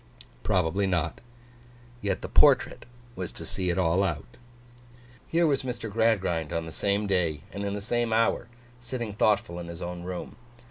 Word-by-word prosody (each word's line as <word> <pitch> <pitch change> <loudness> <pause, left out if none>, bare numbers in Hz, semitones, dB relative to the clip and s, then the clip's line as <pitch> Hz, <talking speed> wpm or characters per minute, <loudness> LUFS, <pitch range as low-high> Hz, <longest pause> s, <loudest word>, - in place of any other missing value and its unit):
Probably 95 +2 +1
not. 85 -4 -1 0.8
Yet 100 -3 -1
the - - -3
portrait - - +4 0.3
was 90 -2 -4
to - - -6
see 90 -1 -1
it 90 - 0
all 90 +1 +3
out. 85 -6 -3 0.9
Here 170 +1 +3
was 145 -4 +2
Mr. 120 -4 -4
Gradgrind 95 -8 +1
on 85 0 -1
the 80 - -7
same 100 +4 0
day, 85 -7 +1
and 100 +2 -5
in 100 0 -2
the 100 - -5
same 120 +1 0
hour, 115 +1 +2 0.3
sitting 120 -3 -4
thoughtful 100 -4 +2
in 85 - -6
his 85 -1 -7
own 85 0 -5
room. 90 +3 -6
95 Hz, 170 wpm, -28 LUFS, 85-110 Hz, 0.9 s, portrait